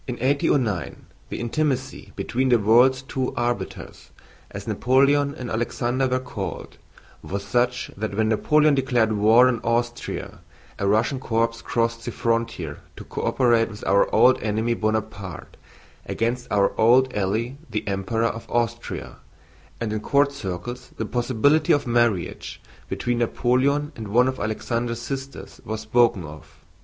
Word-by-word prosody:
CHAPTER 120 - -3 0.3
XXII - - +4
In 135 - +2
1809 95 -6 -4 0.2
the - - -5
intimacy 130 +2 -2
between 130 +2 -1
"the 120 - +5
world's 120 +5 +4
two 130 -2 -3
arbiters," 120 0 -4 0.4
as - - -8
Napoleon 140 +3 +2
and 125 -5 -6
Alexander 120 +3 0
were 130 0 0
called, 115 -6 -6 0.4
was 100 +1 -5
such 125 +2 0
that 105 0 -4
when 110 0 +2
Napoleon 150 +7 +3
declared 125 -5 +2
war 110 +4 +5
on 125 -3 0
Austria 120 +1 -2 0.4
a 100 - 0
Russian 110 +6 +2
corps 115 -1 -1
crossed 115 0 -1
the 120 - -3
frontier 115 -11 -2 0.2
to - - -9
co - - -6
operate 120 -3 +2
with 105 -1 -9
our 100 +1 +3
old 125 +3 +5
enemy 110 +2 0
Bonaparte 110 -5 -3 0.5
against 120 +2 -2
our 100 0 +2
old 125 +3 +5
ally 110 +6 -1
the 110 -2 -4
Emperor 100 +4 -1
of 115 0 -3
Austria, 120 -2 -3 0.6
and 110 -2 -2
in 110 - -1
court 140 +6 +2
circles 120 +1 -6
the 110 - -2
possibility 125 +6 +2
of 145 - +3
marriage 120 -6 0 0.3
between 120 -1 -1
Napoleon 130 +5 +1
and 110 -2 -7
one 120 +5 +3
of 130 0 -3
Alexander's 115 +2 -2
sisters 135 +2 -7
was 110 0 -4
spoken 110 -3 +2
of. 75 +1 -12
120 Hz, 150 wpm, -23 LUFS, 110-130 Hz, 0.6 s, the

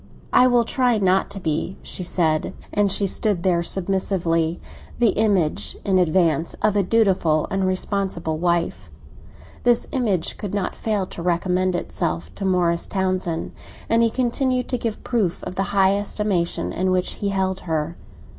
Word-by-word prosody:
"I 255 - +6
will 240 -2 +3
try 245 -1 +2
not 190 -1 +2
to 200 - -7
be," 160 +2 -2
she 185 - -4
said. 160 -3 0 0.2
And 205 -1 +2
she 200 +1 +1
stood 195 -2 0
there 175 -2 +2
submissively, 175 -3 0 0.4
the 235 -2 +4
image, 200 -9 +1
in 190 -2 +3
advance, 165 -2 +2
of 210 -1 +3
a 205 - +4
dutiful 185 -7 +2
and 195 -1 +1
responsible 185 -4 -2
wife. 170 0 -1 0.7
This 240 -1 +2
image 205 -10 -1
could 205 -1 -4
not 200 -2 -1
fail 210 -4 -1
to 180 - -8
recommend 180 +1 +1
itself 85 - -3
to 195 - -5
Morris 175 -2 +1
Townsend, 185 -4 -1 0.4
and 230 +1 +3
he 230 - +4
continued 255 +1 0
to 250 - -1
give 230 -2 -4
proof 210 -8 -1
of - - -5
the 195 +1 -1
high 195 0 +3
estimation 200 -3 -1
in 185 +1 0
which 185 0 +1
he 200 - 0
held 190 -1 -1
her. 160 +1 -1
190 Hz, 160 wpm, -22 LUFS, 170-205 Hz, 0.7 s, I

